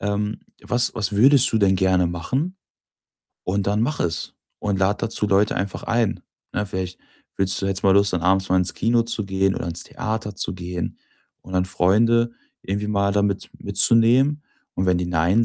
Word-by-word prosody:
ähm, 105 +1 -2 0.2
was 120 0 0
was 110 -1 -1
würdest 130 +5 +5
du 110 - +2
denn 100 -2 +3
gerne 95 -1 +2
machen? 130 - -3 0.9
Und 100 +1 -1
dann 105 +2 +1
mache 150 +6 -1
es 80 -1 -3 0.3
und 100 -2 -1
lade 100 +2 +1
dazu 110 -2 -1
Leute 100 +1 +2
einfach 100 +1 -3
ein, 115 -2 0 0.3
ne? 105 - -1
Vielleicht 95 -1 -5 0.4
willst 95 0 +2
du - - 0
jetzt 95 -1 -2
mal 95 - +4
los, 100 0 +4
dann 85 - -2
abends 95 +1 +2
mal 95 - +2
ins 90 0 0
Kino 115 0 +2
zu 115 -2 -2
gehen 95 0 0
oder - - -4
ins 85 0 -2
Theater 110 -2 -5
zu - - -3
gehen 90 -1 -5 0.4
und 95 - -10
dann 90 0 +2
Freunde 115 +6 +2 0.3
irgendwie 100 +2 -3
mal 100 -1 +1
da 100 0 +1
mit 100 -1 -2
mitzunehmen. 130 +6 +4 0.3
Und 95 - -1
wenn 90 -1 +2
die 90 - -2
„nein“ 90 +6 +2
100 Hz, 190 wpm, -22 LUFS, 95-115 Hz, 0.9 s, würdest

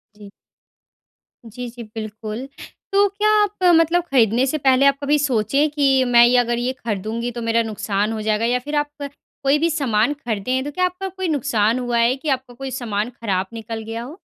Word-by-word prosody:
जी। 205 -1 -13 1.2
जी, 240 +2 -7
जी 235 0 -9
बिल्कुल। 215 +2 -7 0.4
तो 400 +1 +4
क्या 415 +2 0
आप 410 -2 -4
मतलब 345 0 +4
ख़रीदने 240 -1 +3
से 275 +3 -1
पहले 270 -1 +3
आप 280 0 +4
कभी 295 +1 +3
सोचे 255 -2 +1
है 305 - +4
कि 275 -3 +2
मैं 240 -1 +6
ये 245 +1 +4
अगर 240 -1 +1
ये 250 +2 -1
ख़रीदूँगी 230 0 -4
तो 240 0 -6
मेरा 230 0 +1
नुकसान 210 -1 -2
हो 220 - -4
जाएगा? 215 +1 0
या 245 +1 +1
फ़िर 295 +4 -5
आप 295 0 0
अ, 285 - -3 0.4
कोई 275 +2 +3
भी 335 +2 +2
सामान 265 -5 +1
ख़रीदें 235 -4 -3
है 260 - +1
तो 290 - -5
क्या 365 +5 +1
आपका 365 +2 -4
कोई 375 0 -4
नुकसान 235 -6 +1
हुआ 245 -1 -1
है 235 +2 +3
कि 295 +3 -5
आपका 260 -2 -2
कोई 265 +2 -7
सामान 225 -3 -2
ख़राब 200 -6 -2
निकल 225 0 -6
गया 225 +1 -5
हो? 290 +9 -10
245 Hz, 210 wpm, -21 LUFS, 225-290 Hz, 1.2 s, मैं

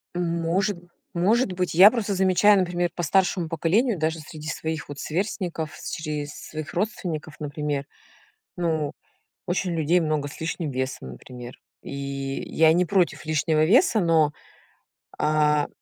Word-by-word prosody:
Может 175 +3 0 0.4
может 200 +6 +2
быть. 180 0 -2
Я 190 +6 +9
просто 220 -4 -1
замечаю, 190 +2 +5
например, 175 -1 0
по 175 - -3
старшему 175 +1 +2
поколению, 185 - +1
даже 160 +1 0
среди 155 0 -9
своих 160 +1 -3
вот 145 - -8
сверстников, 170 -3 -3
с - - -7
чрез 150 -2 -4
своих 155 -1 -7
родственников, 175 -6 -3
например. 145 -1 -3 0.7
Ну, 160 -4 0 0.5
очень 180 -1 -1
людей 165 +3 +3
много 155 -3 -1
с 145 - -11
лишним 160 -2 -3
весом, 130 - -4
например. 120 - -10 0.2
И - - -7 0.5
я 160 0 +4
не 180 +2 +3
против 180 -2 +1
лишнего 155 0 +2
веса, 235 - +4
но, 160 -4 +3 0.9
а, 150 -1 +2
165 Hz, 135 wpm, -25 LUFS, 155-185 Hz, 0.9 s, Я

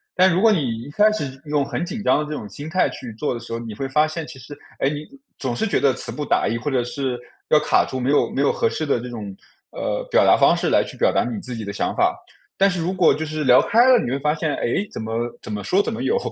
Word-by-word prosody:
但 185 -1 +5
如 185 - +1
果 225 0 +6
你 130 - -1
一 130 - -9
开 210 +8 +4
始 135 -10 -4
用 145 -1 +1
很 140 +4 -3
紧 215 +5 -5
张 - - +4
的 150 - -1
这 150 - -8
种 110 -9 -5
心 145 +10 -8
态 180 +3 +1
去 120 -3 -8
做 145 - -1
的 - - -5
时 115 0 -8
候， 115 - -3
你 115 -2 -7
会 135 +5 -3
发 150 +3 +2
现 155 +1 -5
其 150 -3 -11
实 145 +4 -11 0.2
哎， 135 - +2
你 150 +1 -5 0.3
总 130 -3 -3
是 225 - -1
觉 - - +1
得 135 - +3
词 - - -6
不 150 - -4
达 - - +1
意， 115 - -1
或 130 +5 -3
者 125 -2 +1
是 125 0 -3 0.3
要 155 - +6
卡 - - +2
住 130 - -4
没 125 +2 -1
有 145 - +2
没 135 - 0
有 140 - +3
合 - - 0
适 155 - -3
的 140 -5 +1
这 125 +1 -7
种， 105 -4 -7 0.3
呃， - - -3
表 485 - +4
达 - - +6
方 - - +4
式 - - 0
来 - - +4
去 - - -10
表 - - +2
达 - - +2
你 220 - -4
自 125 -9 -7
己 115 - -5
的 100 - -5
想 100 - -2
法。 - - +2 0.5
但 195 - +6
是 180 -3 -2
如 170 +3 -1
果 180 -3 +4
就 160 - -3
是 155 0 -4
聊 130 0 +7
开 235 +4 +4
了 255 -1 +7
你 120 - -3
会 135 - -1
发 150 +2 +1
现， 155 -2 -1
哎， 190 - -1
怎 - - -6
么 110 0 -5 0.3
怎 - - -10
么 105 -1 -4
说 185 - +2
怎 225 - -3
么 235 +3 -4
有， 450 - +1
145 Hz, 325 characters per minute, -22 LUFS, 125-175 Hz, 0.5 s, 聊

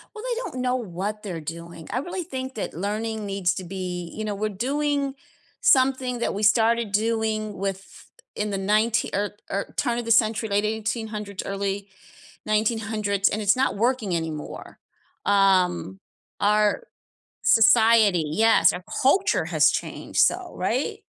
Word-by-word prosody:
Well 430 - -8
they - - -2
don't 255 - -5
know 250 0 +1
what 210 -1 -4
they're 175 -6 -5
doing. 165 +1 -8
I 250 - 0
really 355 +5 -4
think 260 -4 -6
that 215 - -4
learning 215 +4 -3
needs 195 -3 0
to 185 - -5
be 180 -1 -5
you 215 - -4
know, 210 -1 -2
we're 215 +2 -2
doing 280 +5 -1 0.5
something 260 - +3
that - - -1
we 205 - -4
started 225 +1 +3
doing 215 0 -1
with 195 0 -5 0.3
in 210 0 -2
the 195 - -1
ninetee 215 +3 +1
or 205 0 -1 0.2
or 200 - -3
turn 240 -3 0
of 240 - -5
the 230 - -1
century, 220 -1 +3
late 205 +1 +1
1800s, 215 -2 -3
early 200 0 -3 0.6
1900s, 215 -2 +1
and 215 - -3
it's 205 +2 +3
not 260 -4 +1
working 225 -4 0
anymore, 160 -2 -6 0.5
um, 185 - +2 0.4
our 210 - +2 0.6
society 220 -5 +5
Yes, 190 +1 +4
our 180 - -6 0.2
culture 365 +9 +3
has - - +3
changed, - - -4
so - - +2
right? - - -1
215 Hz, 150 wpm, -24 LUFS, 195-235 Hz, 0.6 s, society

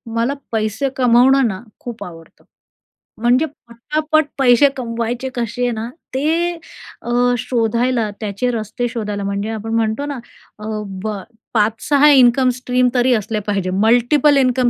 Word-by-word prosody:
"मला 235 +4 +1 0.2
पैसे 220 +4 -1
कमावणं 255 +1 +4
ना 190 -1 -4 0.2
खूप 240 -2 -7
आवडतं. 165 -2 -13 0.8
म्हणजे 245 +5 +3 0.2
पटापट 305 +6 0
पैसे 260 +1 +5
कमवायचे 235 +1 -3
कसे 245 +1 -1
ना, 225 0 -4 0.2
ते 265 +2 -1 0.8
अ, - - -7 0.3
शोधायला, 235 0 0
त्याचे 215 +3 -2
रस्ते 225 +1 -3
शोधायला 210 -4 -4
म्हणजे 200 +2 -3
आपण 225 +1 -5
म्हणतो 225 +5 0
ना, 285 -3 -5 0.4
अ-ब 210 -2 -5 0.4
5-6 230 +7 +3
इन्कम 255 -1 +5
स्ट्रीम 250 0 +1
तरी 250 +1 +3
असले 215 0 -2
पाहिजे. 195 -3 -1 0.2
Multiple 265 +5 +4
income 255 -1 +2
235 Hz, 125 wpm, -18 LUFS, 220-255 Hz, 0.8 s, पैसे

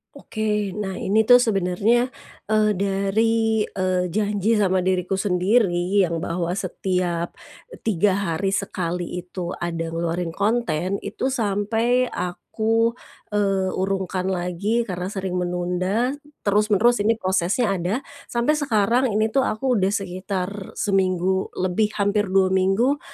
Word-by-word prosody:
Oke, 210 -3 -2
nah 195 -3 -4
ini 220 +3 +2
tuh 245 +2 +7
sebenernya, 220 +3 +1 0.4
eee, 215 0 +4
dari, 215 +3 +1
eee, 185 -1 -1
janji 210 +2 +1
sama 185 -2 +2
diriku 185 0 0
sendiri 190 -1 +2
yang 170 -1 -1
bahwa 170 0 -2
setiap 180 -2 -2 0.6
3 205 0 +3
hari 190 +1 -1
sekali 180 -3 -2 0.2
itu 180 0 -5
ada 165 -1 -3
ngeluarin 165 0 -2
konten 200 -4 0
itu 265 - -3
sampai 225 +2 +1
aku, 220 +6 0 0.4
eee, 195 -2 +1
urungkan 190 -1 -2
lagi 190 +5 0
karena 180 -4 -4
sering 190 -2 -3
menunda, 180 +6 0 0.3
terus-menerus 210 +3 +3
ini 225 +2 +2
prosesnya 190 +2 +1
ada, 195 +10 -2 0.2
sampai 240 +5 +1
sekarang 240 0 +2
ini 220 +1 +1
tuh 270 - +2
aku 235 +1 0
udah 195 +3 +1
sekitar 190 0 -4
seminggu 190 -1 0
lebih, 185 +4 +1
hampir 205 0 +1
2 190 0 +3
minggu 195 +10 +2
195 Hz, 120 wpm, -23 LUFS, 180-215 Hz, 0.6 s, tuh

